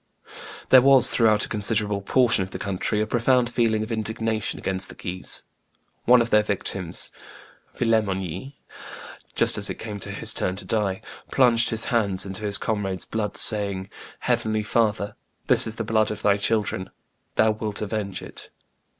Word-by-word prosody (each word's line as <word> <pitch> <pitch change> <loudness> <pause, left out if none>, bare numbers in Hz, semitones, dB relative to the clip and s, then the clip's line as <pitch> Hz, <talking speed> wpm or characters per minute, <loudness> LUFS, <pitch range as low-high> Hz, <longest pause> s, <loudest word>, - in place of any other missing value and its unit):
There 130 - +8
was, 135 -1 +5
throughout 110 -3 +3
a - - -11
considerable 105 -1 -1
portion 120 +1 +2
of 95 - -4
the - - -7
country, 100 +2 -2
a - - 0
profound 120 +1 +1
feeling 115 -3 0
of 110 - -7
indignation 110 0 -2
against 95 0 -1
the - - -10
Guises. 90 +1 -2 0.6
One 125 0 +5
of 115 - -7
their 105 - +5
victims, 95 -4 -3 0.7
Villemongey, 100 - -2 0.8
just - - +4
as - - +3
it - - -5
came 105 -2 -7
to - - -6
his - - -3
turn 90 - -2
to 100 0 -9
die, 100 -2 -2 0.3
plunged 120 -3 +3
his 110 0 +1
hands 100 -5 +1
into 95 +2 -2
his 100 -1 +3
comrades' 100 -4 -3
blood, 105 -2 -4
saying, 100 -2 +4 0.3
"Heavenly 110 -3 -1
Father, 105 -2 -1 0.3
this - - +6
is 110 - -4
the - - -4
blood 110 0 +1
of 105 - -6
Thy 100 -1 +3
children: 100 -2 -1 0.5
Thou 110 0 +3
wilt 105 -1 -4
avenge 105 -2 -4
it!" - - -7
105 Hz, 165 wpm, -23 LUFS, 100-115 Hz, 0.8 s, There